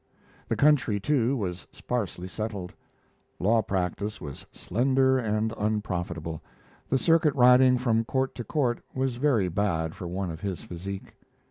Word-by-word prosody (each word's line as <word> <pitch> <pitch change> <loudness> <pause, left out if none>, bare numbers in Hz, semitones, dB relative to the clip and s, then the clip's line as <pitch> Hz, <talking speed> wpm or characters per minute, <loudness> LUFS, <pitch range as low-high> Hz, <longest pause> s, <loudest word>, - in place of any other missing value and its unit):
The - - 0
country, 135 -8 +3
too, 135 +2 +1
was 90 - -4
sparsely 95 -7 -3
settled; 100 -2 -5 0.6
law 110 +4 +3
practice 100 +2 -2
was 70 -2 -8
slender 130 +4 +2
and 110 -1 0
unprofitable, 90 -7 -2 0.5
the 135 - +3
circuit 160 0 +3
riding 125 0 +6
from 115 -2 +1
court 130 +2 -1
to 120 - -6
court 120 0 0
was 130 -2 -1
very 125 -8 +2
bad 85 -4 -1
for 90 - -7
one 90 0 -3
of 80 0 -8
his 95 -3 -4
physique. 95 +3 -7
110 Hz, 140 wpm, -27 LUFS, 90-125 Hz, 0.6 s, riding